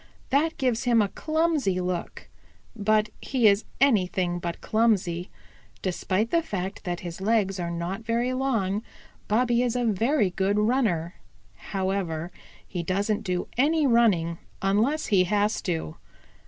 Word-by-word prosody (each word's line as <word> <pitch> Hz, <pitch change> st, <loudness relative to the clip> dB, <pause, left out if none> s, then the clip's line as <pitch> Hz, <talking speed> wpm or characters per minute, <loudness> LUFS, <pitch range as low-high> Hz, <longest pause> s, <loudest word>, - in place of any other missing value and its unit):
That 310 Hz, +4 st, +2 dB
gives 250 Hz, -2 st, 0 dB
him 240 Hz, -2 st, +4 dB
a 205 Hz, -2 st, +2 dB
clumsy 310 Hz, -, 0 dB
look, 180 Hz, -1 st, -4 dB, 0.5 s
but 215 Hz, 0 st, +2 dB
he 250 Hz, -5 st, +2 dB
is 200 Hz, +1 st, +3 dB
anything 185 Hz, -8 st, +2 dB
but 170 Hz, -1 st, -4 dB
clumsy. 195 Hz, -6 st, +1 dB, 0.5 s
Despite 190 Hz, +4 st, -1 dB
the 335 Hz, -, +3 dB
fact 195 Hz, -, -5 dB
that 175 Hz, -1 st, -3 dB
his 175 Hz, 0 st, -7 dB
legs 200 Hz, -2 st, +1 dB
are 170 Hz, -1 st, -2 dB
not 170 Hz, +4 st, -4 dB
very 235 Hz, +3 st, 0 dB
long 225 Hz, -7 st, 0 dB, 0.5 s
Bobby 240 Hz, +2 st, +2 dB
is 250 Hz, -1 st, 0 dB
a 245 Hz, -1 st, 0 dB
very 225 Hz, 0 st, +2 dB
good 195 Hz, +3 st, 0 dB
runner. 210 Hz, -7 st, +1 dB, 0.4 s
However, 185 Hz, -4 st, -3 dB, 0.3 s
he 180 Hz, -, -4 dB
doesn't 200 Hz, +5 st, 0 dB
do 180 Hz, -1 st, -2 dB
any 305 Hz, +3 st, +3 dB
running 200 Hz, -10 st, +3 dB, 0.2 s
unless 215 Hz, +10 st, +1 dB
he 190 Hz, -4 st, +3 dB
has 210 Hz, +3 st, +1 dB
to. 165 Hz, -, -3 dB
205 Hz, 140 wpm, -26 LUFS, 180-235 Hz, 0.5 s, him